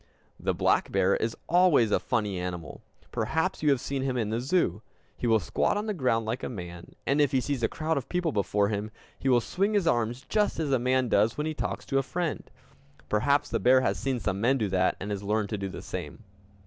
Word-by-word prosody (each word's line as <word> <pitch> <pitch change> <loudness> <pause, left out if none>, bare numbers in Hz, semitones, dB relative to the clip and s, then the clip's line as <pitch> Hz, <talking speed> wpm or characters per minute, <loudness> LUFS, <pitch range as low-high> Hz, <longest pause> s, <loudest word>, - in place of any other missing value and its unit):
The - - -1
black - - +2
bear 95 0 +3
is 115 0 -2
always 170 - +4
a - - +3
funny 105 -5 -1
animal. 90 -2 -5 0.3
Perhaps 160 +9 -1
you 150 - +3
have 135 -3 +3
seen 135 +2 -3
him 130 -1 -1
in 110 -3 -1
the 115 +2 -1
zoo. 130 - +1 0.3
He 120 - -3
will 110 -1 +4
squat 105 - 0
on 210 - -2
the 215 - -1
ground 125 - +1
like 115 +4 -2
a - - -4
man, 90 -6 -8
and 140 +2 +2
if 145 - +3
he 130 - +4
sees 135 0 -2
a 115 - +3
crowd 160 +3 -2
of 135 - -4
people 175 -3 0
before 100 -2 +1
him, 105 0 -2 0.3
he 135 - 0
will 120 -2 +5
swing 200 - 0
his 200 -4 +2
arms 120 -3 0
just 210 -5 +1
as 150 -3 -1
a 130 - +3
man 130 +1 +2
does 110 +2 +2
when 150 - -1
he 155 - -2
talks 150 - -4
to 135 - +1
a - - +2
friend. 165 +4 -3 0.6
Perhaps 140 +7 +2
the - - 0
bear 130 +1 +5
has - - 0
seen 135 -2 -1
some 95 -2 -2
men 130 +4 +3
do 110 -5 -1
that, 95 -1 +1
and 105 +2 -5
has 100 -1 -3
learned 105 0 -1
to 105 - -2
do 100 0 -3
the - - -8
same! - - -6
125 Hz, 240 wpm, -28 LUFS, 105-145 Hz, 0.6 s, will